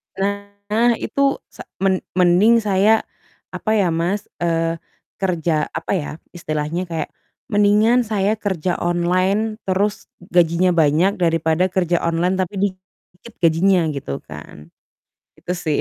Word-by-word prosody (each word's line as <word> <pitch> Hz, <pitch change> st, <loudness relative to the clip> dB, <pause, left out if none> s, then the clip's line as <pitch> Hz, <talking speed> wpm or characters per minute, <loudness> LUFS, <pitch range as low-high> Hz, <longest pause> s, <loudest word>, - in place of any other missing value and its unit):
Nah, 200 Hz, +4 st, -1 dB
itu 275 Hz, +4 st, 0 dB
sa -, -, -12 dB, 0.2 s
men 190 Hz, -1 st, +2 dB, 0.2 s
mending 185 Hz, +6 st, +4 dB
saya, 210 Hz, +2 st, +3 dB, 0.5 s
apa 220 Hz, 0 st, -1 dB
ya 195 Hz, -5 st, +2 dB
Mas, 175 Hz, +6 st, -1 dB
eee, 165 Hz, -1 st, 0 dB, 0.4 s
kerja, 170 Hz, -5 st, 0 dB
apa 165 Hz, -, -4 dB
ya, 150 Hz, -5 st, -3 dB, 0.2 s
istilahnya 160 Hz, +1 st, -3 dB
kayak 165 Hz, -1 st, -4 dB, 0.4 s
mendingan 210 Hz, +4 st, +4 dB
saya 205 Hz, -1 st, +1 dB
kerja 185 Hz, -4 st, -2 dB
online, 185 Hz, +5 st, 0 dB
terus 200 Hz, +3 st, -1 dB
gajinya 175 Hz, 0 st, +2 dB
banyak 165 Hz, +4 st, +2 dB
daripada 165 Hz, +1 st, +2 dB
kerja 175 Hz, -2 st, 0 dB
online 170 Hz, +2 st, 0 dB
tapi 185 Hz, +2 st, -2 dB
dikit 185 Hz, +2 st, -7 dB
gajinya 175 Hz, +4 st, +4 dB
gitu 130 Hz, -, -5 dB
kan, 75 Hz, +1 st, -12 dB, 0.7 s
itu -, -, -5 dB
sih, 155 Hz, -4 st, -1 dB
185 Hz, 120 wpm, -20 LUFS, 165-200 Hz, 0.7 s, mending